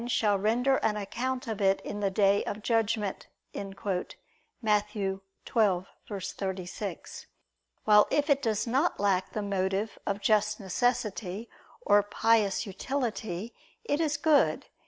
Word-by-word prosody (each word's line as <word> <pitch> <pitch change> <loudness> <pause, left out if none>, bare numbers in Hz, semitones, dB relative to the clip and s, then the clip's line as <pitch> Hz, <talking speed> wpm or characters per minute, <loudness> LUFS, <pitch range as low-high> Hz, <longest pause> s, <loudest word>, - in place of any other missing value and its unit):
shall 210 -4 +2
render 245 +6 +2
an 210 -1 0
account 250 +5 -3
of 220 -3 -4
it 195 0 +3
in 205 - -5
the 200 -1 +1
day 200 +1 +3
of 210 +1 -5
judgment" 225 -3 0 0.3
(Matt. 200 +2 -3
12:36): 195 -1 -3 0.6
while 210 -1 +6
if 290 0 +1
it 280 -2 +3
does 215 -4 0
not 270 +8 +1
lack 195 -2 +1
the 215 - -2
motive 195 +1 -1
of 200 0 -1
just 215 +1 +2
necessity 210 0 -1 0.3
or 205 - +5
pious 210 0 +2
utility, 220 -2 -3 0.3
it 295 -7 0
is 295 -2 +1
good. 300 -1 +3
210 Hz, 120 wpm, -29 LUFS, 195-230 Hz, 0.6 s, while